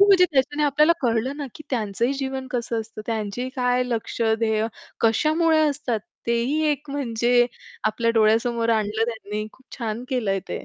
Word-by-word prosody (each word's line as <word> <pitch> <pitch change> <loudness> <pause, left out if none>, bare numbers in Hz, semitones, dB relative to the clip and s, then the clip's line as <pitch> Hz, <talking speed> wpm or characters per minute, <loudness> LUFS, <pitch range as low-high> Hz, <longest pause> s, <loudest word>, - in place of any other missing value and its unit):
हो, 400 - +8
म्हणजे 380 -2 +7
त्याच्याने 290 +2 +1
आपल्याला 300 +3 +4
कळलं 240 +3 0
ना, 290 -2 -4
की - - -10
त्यांचंही 230 +1 0
जीवन 265 -1 -3
कसं 235 -2 -1
असतं. 220 0 -9
त्यांचीही 225 +2 -2
काय 250 0 +2
लक्ष्य, 230 -1 0
ध्येय 220 -1 +1 0.3
कशामुळे 315 +8 +3
असतात. 270 -6 -2 0.3
तेही 235 +6 +1
एक 290 0 -3
म्हणजे 245 -3 +2 0.4
आपल्या 230 +2 +1
डोळ्यासमोर 230 +1 +3
आणलं 215 +1 0
त्यांनी 215 -1 -5
खूप 260 - -23
छान 230 0 -3
केलंय 210 -7 0
ते. - - -5
240 Hz, 160 wpm, -24 LUFS, 220-270 Hz, 0.4 s, हो